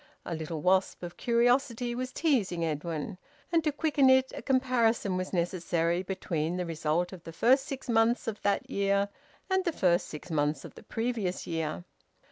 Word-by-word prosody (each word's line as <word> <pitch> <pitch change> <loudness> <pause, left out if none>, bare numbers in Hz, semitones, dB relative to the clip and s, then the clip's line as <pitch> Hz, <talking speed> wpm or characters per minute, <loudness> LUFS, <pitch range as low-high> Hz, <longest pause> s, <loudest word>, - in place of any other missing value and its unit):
A 175 - -3
little 160 -1 -4
wasp 185 0 +2
of 175 0 -6
curiosity 245 0 +2
was 255 +1 -3
teasing 210 - +1
Edwin, 160 +4 -3 0.3
and 330 -2 +3
to 305 - +1
quicken 290 -2 +3
it 260 0 +4
a - - -6
comparison 240 -7 +2
was 185 0 -3
necessary 175 -1 0
between 175 -3 -2
the 180 - -2
result 165 +2 -1
of 175 -3 -10
the 165 - -8
first 260 - +3
six 275 -3 -6
months 230 0 +2
of 215 -2 -3
that 200 0 0
year 200 0 +1 0.4
and 380 -1 +1
the 345 - 0
first 175 - +2
six 155 +3 -8
months 145 -2 0
of - - -10
the - - -13
previous 225 -6 -2
year. 165 0 -3
195 Hz, 175 wpm, -29 LUFS, 170-250 Hz, 0.4 s, it